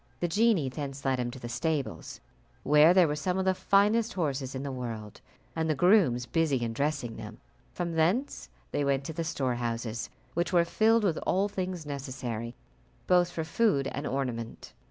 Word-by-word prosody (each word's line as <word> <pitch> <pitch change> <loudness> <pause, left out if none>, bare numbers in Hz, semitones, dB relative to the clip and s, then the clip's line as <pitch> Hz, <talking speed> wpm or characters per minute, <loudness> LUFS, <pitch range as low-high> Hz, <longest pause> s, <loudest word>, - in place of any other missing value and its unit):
The 175 - 0
genie 205 - +3
thence 140 0 -6
led 130 -1 +1
him 120 -1 -1
to 125 - -8
the 120 - -6
stables, 140 +4 -3 0.4
where 150 +3 +6 0.2
were 150 - -1
some 180 +5 -1
of 190 - 0
the 190 - +3
finest 210 +4 +2
horses 140 -6 -2
in 130 - -4
the 140 - -3
world, 115 -5 -6 0.3
and 160 -1 -1
the 155 - +2
grooms 165 - +4
busy 140 -1 +1
in 115 -1 -2
dressing 140 -3 -2
them; - - -9 0.3
from 170 -1 -3
thence 180 - 0 0.2
they 145 - 0
went 140 -1 +1
to 160 - -5
the 165 +1 -2
storehouses, 120 -6 -2 0.2
which 170 +2 -1
were 175 -2 +4
filled 220 +5 +3
with 175 -6 +1
all 195 +2 +1
things 185 -4 -4
necessary, 125 -5 -5 0.5
both 180 -1 +4
for 165 -2 -3
food 165 -4 +1
and 140 +1 -4
ornament. 125 -4 -4
150 Hz, 175 wpm, -29 LUFS, 130-175 Hz, 0.5 s, where